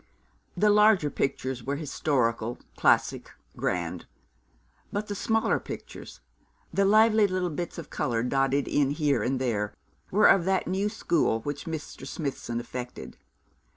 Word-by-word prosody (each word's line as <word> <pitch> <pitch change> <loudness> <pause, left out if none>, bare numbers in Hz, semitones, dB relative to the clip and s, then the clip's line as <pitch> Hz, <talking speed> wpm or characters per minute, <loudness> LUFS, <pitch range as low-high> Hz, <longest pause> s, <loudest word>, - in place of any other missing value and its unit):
The 210 0 +4
larger 210 -7 +5
pictures 130 -2 -2
were 140 +3 -2
historical, 125 -6 -1 0.2
classic, - - +2 0.3
grand; - - -2 0.8
but 205 +1 -2
the 205 - -4
smaller 225 +2 +1
pictures - - -9 0.5
the 200 - +3
lively 215 +1 +5
little 185 -2 -1
bits 170 +3 -5
of 170 - -8
colour 120 -6 -1
dotted 135 +2 +1
in 145 -2 +2
here 145 -4 +1
and 130 +4 0
there 105 -5 -1 0.3
were 210 +3 +3
of 190 -3 +6
that 190 0 +1
new 195 +3 0
school 170 - 0
which 145 +3 -5
Mr. 160 -2 -6
Smithson 130 -6 -4
affected. 125 +1 -7
145 Hz, 135 wpm, -27 LUFS, 130-195 Hz, 0.8 s, of